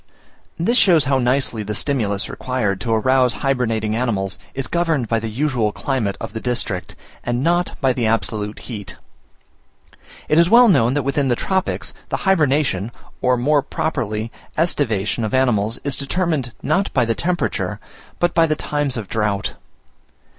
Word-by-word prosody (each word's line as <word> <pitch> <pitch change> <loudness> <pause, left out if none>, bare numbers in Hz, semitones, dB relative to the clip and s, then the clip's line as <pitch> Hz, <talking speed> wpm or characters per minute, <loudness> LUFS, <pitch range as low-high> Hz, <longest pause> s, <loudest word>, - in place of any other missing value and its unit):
This 235 +9 +2
shows 170 -6 +5
how 135 -1 +2
nicely 125 -2 +1
the 105 0 -4
stimulus 105 -7 0
required 115 -7 -2
to 115 - -2
arouse 125 +2 +3
hybernating 115 -5 0
animals 105 -5 -1 0.2
is 135 0 -2
governed 165 -5 0
by 115 0 +1
the 110 0 -4
usual 120 -3 0
climate 115 -5 -2
of 115 -2 -6
the 110 - -3
district, 115 -6 -3 0.3
and 120 +2 -1
not 175 +2 0
by 130 -2 +3
the 120 -3 0
absolute 110 -1 -1
heat. 100 -7 -7 1.3
It 155 - +4
is 170 +1 +5
well 240 +3 +7
known 125 - +4
that 145 - +1
within 140 +1 0
the 120 - +2
tropics, 190 +8 -2 0.2
the - - -1
hybernation, 145 - +2 0.3
or 125 0 +3
more 145 +4 +3
properly 115 -8 -3 0.3
aestivation, 115 - 0
of 110 +3 -1
animals 115 -4 +2
is 140 -2 0
determined 145 -3 -1
not 195 +2 +1
by 125 -3 +4
the 115 - +1
temperature, 175 +7 -1 0.4
but 175 - +1
by 165 -1 +4
the 155 - +1
times 145 -4 -2
of 110 -4 -5
drought. 105 -2 -1
125 Hz, 160 wpm, -20 LUFS, 110-150 Hz, 1.3 s, well